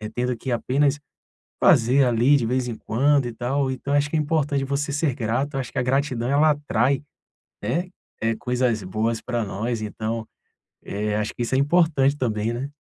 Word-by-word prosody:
tendo 125 Hz, 0 st, 0 dB
que 130 Hz, -, -5 dB
apenas 140 Hz, +4 st, +1 dB, 0.6 s
fazer 130 Hz, +4 st, +5 dB
ali 125 Hz, +4 st, +4 dB
de 120 Hz, -4 st, 0 dB
vez 125 Hz, +1 st, 0 dB
em 115 Hz, -, -4 dB
quando 140 Hz, +5 st, +2 dB
e 120 Hz, -, -4 dB
tal 130 Hz, +2 st, -1 dB
então 135 Hz, +2 st, -4 dB
acho 145 Hz, +1 st, +2 dB
que -, -, -6 dB
é -, -, +2 dB
importante 145 Hz, -2 st, 0 dB
você 140 Hz, +1 st, -2 dB
ser 145 Hz, -2 st, 0 dB
grato, 125 Hz, +4 st, -2 dB
eu 135 Hz, -, 0 dB
acho 125 Hz, -, -6 dB
que 135 Hz, -, -3 dB
a -, -, +2 dB
gratidão 130 Hz, -2 st, 0 dB
ela 150 Hz, +2 st, +4 dB
atrai, 140 Hz, -2 st, +1 dB, 0.6 s
né, 170 Hz, -, -1 dB, 0.3 s
eh, 115 Hz, 0 st, +1 dB
coisas 125 Hz, -4 st, 0 dB
boas 110 Hz, +4 st, -1 dB
pra 120 Hz, -3 st, -2 dB
nós 110 Hz, +4 st, -3 dB
então, 110 Hz, +2 st, -4 dB, 0.6 s
eh, 105 Hz, +1 st, -2 dB
acho 105 Hz, 0 st, -2 dB
que 120 Hz, -, -3 dB
isso 120 Hz, -, -1 dB
é -, -, +3 dB
importante 145 Hz, -2 st, +3 dB
também, 110 Hz, -3 st, -1 dB
né. 130 Hz, +4 st, -4 dB
125 Hz, 190 wpm, -23 LUFS, 115-140 Hz, 0.6 s, fazer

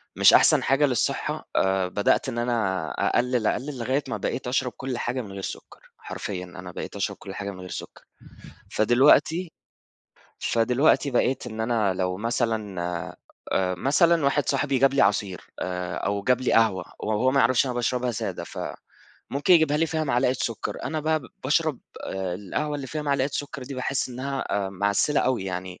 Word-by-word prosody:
مش -, -, +7 dB
أحسن -, -, +6 dB
حاجة 135 Hz, +3 st, +3 dB
للصحة، 125 Hz, -5 st, -1 dB
آآ، 95 Hz, -1 st, +2 dB
بدأت 100 Hz, +7 st, +1 dB
إن 120 Hz, -, -5 dB
أنا 110 Hz, -8 st, 0 dB, 0.2 s
أقلِّل، 125 Hz, -2 st, +1 dB
أقلِّل، 140 Hz, +1 st, -2 dB
لغاية 130 Hz, +5 st, 0 dB
ما -, -, -3 dB
بقيت 130 Hz, -, -3 dB
أشرب 125 Hz, 0 st, 0 dB
كل 130 Hz, -2 st, -4 dB
حاجة 125 Hz, +2 st, -2 dB
من 105 Hz, -5 st, -9 dB
غير 95 Hz, 0 st, -6 dB
سكر. -, -, -8 dB, 0.2 s
حرفيًا، 95 Hz, -3 st, -5 dB
أنا 90 Hz, 0 st, -9 dB
بقيت -, -, -7 dB
أشرب -, -, -2 dB
كل 95 Hz, -, -9 dB
حاجة 100 Hz, -1 st, -4 dB
من 95 Hz, -, -11 dB
غير 90 Hz, 0 st, -8 dB
سكر. -, -, -8 dB, 0.7 s
فدلوقتي 145 Hz, -, +4 dB, 0.9 s
فدلوقتي، 125 Hz, +5 st, +2 dB
بقيت 130 Hz, +1 st, +1 dB
إن 110 Hz, -2 st, -6 dB
أنا، 110 Hz, -4 st, +1 dB
لو 90 Hz, 0 st, -1 dB
مثلًا 110 Hz, -3 st, -1 dB, 0.7 s
آآ، 90 Hz, -1 st, +1 dB
مثلًا 150 Hz, -, +3 dB
واحد 140 Hz, +1 st, +1 dB
صاحبي 140 Hz, -3 st, +1 dB
جاب 135 Hz, +1 st, +4 dB
لي 140 Hz, -, +4 dB
عصير، 100 Hz, -2 st, +1 dB, 0.2 s
آآ، 90 Hz, -1 st, -3 dB
أو 100 Hz, 0 st, -1 dB
جاب 125 Hz, +3 st, +2 dB
لي 130 Hz, -, 0 dB
قهوة، 110 Hz, -5 st, +3 dB, 0.2 s
و -, -, -5 dB
وهو 110 Hz, +4 st, +2 dB
ما 140 Hz, +1 st, +3 dB
يعرفش 130 Hz, +1 st, +4 dB
أنا 125 Hz, -, -2 dB
باشربها 125 Hz, +1 st, 0 dB
سادة، 110 Hz, -, -4 dB
فممكن -, -, -8 dB, 0.6 s
يجيبها 160 Hz, -3 st, +4 dB
لي 165 Hz, +2 st, +2 dB
فيها 160 Hz, 0 st, -1 dB
معلقة 125 Hz, -2 st, +2 dB
سكر. 115 Hz, -3 st, -3 dB
أنا 155 Hz, +4 st, -2 dB
بقى 155 Hz, +1 st, +1 dB, 0.2 s
باشرب، 150 Hz, 0 st, +1 dB, 0.3 s
آآ، 95 Hz, -2 st, -3 dB
القهوة 145 Hz, +11 st, -3 dB
اللي 140 Hz, -2 st, -6 dB
فيها 155 Hz, +3 st, -4 dB
معلقة 140 Hz, -1 st, +1 dB
سكر 145 Hz, -2 st, -4 dB
دي، 135 Hz, +2 st, -7 dB
باحِس 130 Hz, +1 st, -1 dB
إنها، 135 Hz, +2 st, -3 dB, 0.3 s
آآ، -, -, -5 dB
معسِّلة 100 Hz, +9 st, +1 dB
أوي 125 Hz, -6 st, 0 dB
يعني 90 Hz, -1 st, -5 dB
125 Hz, 175 wpm, -25 LUFS, 100-135 Hz, 0.9 s, مش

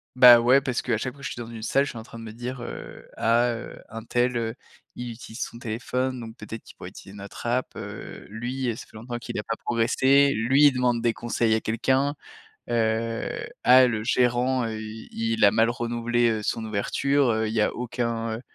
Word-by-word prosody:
Bah, 125 Hz, -2 st, +10 dB
ouais, 125 Hz, +4 st, +5 dB
parce 130 Hz, -3 st, -1 dB
qu'à -, -, 0 dB
chaque 130 Hz, +4 st, -3 dB
fois 140 Hz, -, -18 dB
que -, -, -2 dB
je -, -, -5 dB
suis 120 Hz, -, -7 dB
dans 115 Hz, -, -7 dB
une 115 Hz, -1 st, -8 dB
salle, 135 Hz, +5 st, +2 dB
je 140 Hz, -, -3 dB
suis -, -, -8 dB
en -, -, -8 dB
train 115 Hz, -, -12 dB
de -, -, -9 dB
me 110 Hz, -, -7 dB
dire, 120 Hz, +3 st, -6 dB
heu: -, -, -8 dB
«Ah, 120 Hz, +2 st, +3 dB
heu, 115 Hz, -, -8 dB
untel, 120 Hz, +2 st, -1 dB
heu, 115 Hz, 0 st, -2 dB, 0.4 s
il 120 Hz, -1 st, -5 dB
utilise 115 Hz, -1 st, -9 dB
son 115 Hz, -, -5 dB
téléphone, 125 Hz, +3 st, -2 dB
donc 115 Hz, 0 st, -9 dB
peut-être 110 Hz, +1 st, -8 dB
qu'il -, -, -16 dB
pourrait -, -, -8 dB
utiliser 95 Hz, -, -12 dB
notre 100 Hz, +3 st, -9 dB
app, 125 Hz, +2 st, -1 dB
heu, -, -, -8 dB
lui 120 Hz, +4 st, -3 dB
ça -, -, -9 dB
fait -, -, -21 dB
longtemps 120 Hz, +2 st, -6 dB
qu'il -, -, -6 dB
a 105 Hz, -, -2 dB
pas 115 Hz, +1 st, -3 dB
progressé. 130 Hz, +4 st, +4 dB
Lui, 130 Hz, +6 st, +3 dB
il -, -, +5 dB
demande 125 Hz, -2 st, +1 dB
des 120 Hz, -, +2 dB
conseils 115 Hz, 0 st, 0 dB
à 110 Hz, -, +3 dB
quelqu'un, 130 Hz, +6 st, +1 dB, 0.5 s
heu, 115 Hz, 0 st, -1 dB, 0.2 s
ah, 130 Hz, +1 st, +7 dB
le 110 Hz, -3 st, -2 dB
gérant, 125 Hz, +1 st, +2 dB
heu, 110 Hz, -1 st, -4 dB
il 110 Hz, 0 st, -1 dB
a 100 Hz, -, +6 dB
mal 115 Hz, +1 st, +3 dB
renouvelé, 120 Hz, 0 st, 0 dB
heu, 110 Hz, -2 st, -1 dB
son 110 Hz, +2 st, -2 dB
ouverture, 130 Hz, +6 st, +1 dB
heu, 110 Hz, 0 st, 0 dB
il 110 Hz, -, -3 dB
y 110 Hz, -, +2 dB
a -, -, +1 dB
aucun, 115 Hz, -2 st, -2 dB
heu, 115 Hz, -, -7 dB
120 Hz, 225 wpm, -25 LUFS, 115-125 Hz, 0.5 s, Bah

